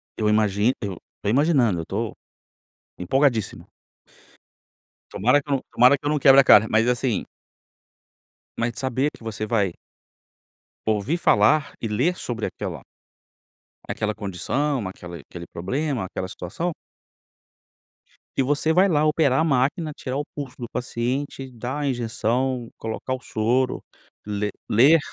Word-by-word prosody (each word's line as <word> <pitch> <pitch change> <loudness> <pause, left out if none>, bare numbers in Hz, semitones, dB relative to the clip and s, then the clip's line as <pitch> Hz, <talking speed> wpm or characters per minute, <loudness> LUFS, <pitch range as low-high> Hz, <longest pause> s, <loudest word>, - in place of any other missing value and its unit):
Eu 110 -1 +1
imagino, 105 +2 +2
eu 100 -5 -4 0.3
tô - - 0
imaginando, 130 - +3
eu - - -7
tô 105 +4 -3 0.9
empolgadíssimo. 120 +4 +1 1.4
Tomara 125 +8 +3
que 145 - -17
eu 140 - +3
não 135 - -3
tomara 125 +4 +6
que 135 - -15
eu - - +2
não 150 0 +1
quebre 135 0 +8
a - - 0
cara, 110 -3 +7
mas 115 +2 +3
assim 125 -3 0 1.3
mas 115 +1 -1
de 115 - -9
saber 130 +2 0
que - - -16
você 110 -1 -4
vai 105 -5 +1 1.1
ouvir 110 - 0
falar 140 0 +3
e 115 - -1
ler 130 +12 +1
sobre 115 -9 -4
aquela - - -5 1.1
aquela 105 0 -2
condição, 110 - -2
aquela 85 -2 -8
aquele 85 +4 -10
problema, 130 - -2
aquela 95 0 -5
situação 130 - -4 1.6
e 135 - +2
você 145 +4 +1
vai 185 +4 +5
lá 155 -4 +2
operar 150 -3 +3
a - - +3
máquina, 150 +2 +1
tirar 130 0 -4
o 145 - -2
pulso 140 -4 -6
do 120 - -5
paciente, 130 +2 -3
dar 125 +4 -5
a 145 - -1
injeção, 120 0 -1
colocar 115 +3 -4
o 130 - -3
soro, 125 +4 0 0.4
ler 105 0 -2 0.2
ler 140 +9 +6
125 Hz, 145 wpm, -24 LUFS, 110-140 Hz, 1.6 s, quebre